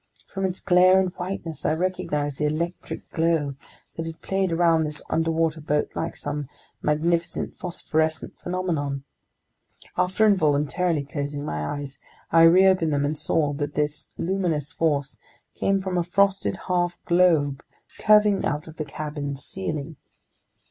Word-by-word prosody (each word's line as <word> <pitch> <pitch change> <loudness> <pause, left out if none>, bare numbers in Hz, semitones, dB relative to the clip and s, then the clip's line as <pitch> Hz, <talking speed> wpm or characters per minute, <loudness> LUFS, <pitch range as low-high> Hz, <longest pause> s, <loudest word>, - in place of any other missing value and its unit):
From 195 -1 -1
its 185 -1 -2
glare 185 +1 +6
and 185 -2 0
whiteness, 180 -3 -5
I - - +2
recognized 160 -5 -2
the 150 - +1
electric 170 +4 -4
glow 160 -4 +1 0.4
that 165 0 -4
had 165 0 -7
played 190 -2 0
around 165 -1 +3
this 150 -1 -5
underwater 165 -1 +1
boat 150 0 0
like 165 - -3
some 145 -1 -4 0.3
magnificent 165 +3 0
phosphorescent 160 -3 -2
phenomenon. 160 -7 -2 0.9
After 185 +4 +2
involuntarily 155 -3 +2
closing 145 -1 -4
my 75 0 -3
eyes, 140 -1 -7 0.3
I 165 0 +7
reopened 185 -1 +5
them 145 0 +1
and 150 +2 -1
saw 150 -1 +1
that 145 0 -4
this 150 0 -1
luminous 170 -6 -1
force 145 -4 -1 0.3
came 195 0 +1
from 190 -2 -1
a - - +1
frosted 195 +2 +2
half 175 -1 0
globe 165 -6 +3 0.4
curving 210 -2 +5
out 150 +2 -1
of 160 - -11
the 155 - -3
cabin's 145 -1 -5
ceiling. 155 -5 -4
165 Hz, 140 wpm, -25 LUFS, 150-180 Hz, 0.9 s, I